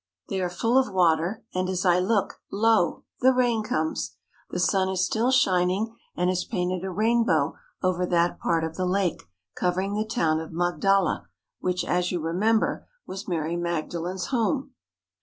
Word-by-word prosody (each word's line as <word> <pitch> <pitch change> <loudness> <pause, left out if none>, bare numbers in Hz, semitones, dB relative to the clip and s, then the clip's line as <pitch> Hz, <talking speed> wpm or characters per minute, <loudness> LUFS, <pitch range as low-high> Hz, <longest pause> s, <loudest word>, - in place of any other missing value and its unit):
They 190 -1 -1
are 180 - 0
full 230 +8 +2
of 255 -6 0
water; 180 +4 +2
and 185 0 -1
as 185 0 -1
I 180 0 +5
look, 200 +2 0
lo! 220 -3 +2 0.2
the 260 +1 +5
rain 245 -3 +2
comes. 155 - -2 0.3
The - - -3
sun 190 +1 +2
is 190 0 +1
still 225 +5 +1
shining 195 -3 +2 0.2
and 180 - +1
has 185 0 -1
painted 180 -3 -2
a 190 - -3
rainbow 210 -7 +2 0.3
over 180 -1 +1
that 170 0 +1
part 165 -1 +1
of 160 0 -3
the 185 -1 0
lake 185 -2 0 0.3
covering 185 +3 0
the 210 +1 0
town 160 -7 +1
of 160 - -7
Magdala, 175 +3 +1 0.3
which, 180 0 -1
as 180 0 0
you 180 - -1
remember, 195 +8 +1 0.2
was 195 +2 -7
Mary 165 -2 -1
Magdalen's 175 +1 -3
home. 260 +3 0
185 Hz, 165 wpm, -26 LUFS, 175-215 Hz, 0.3 s, I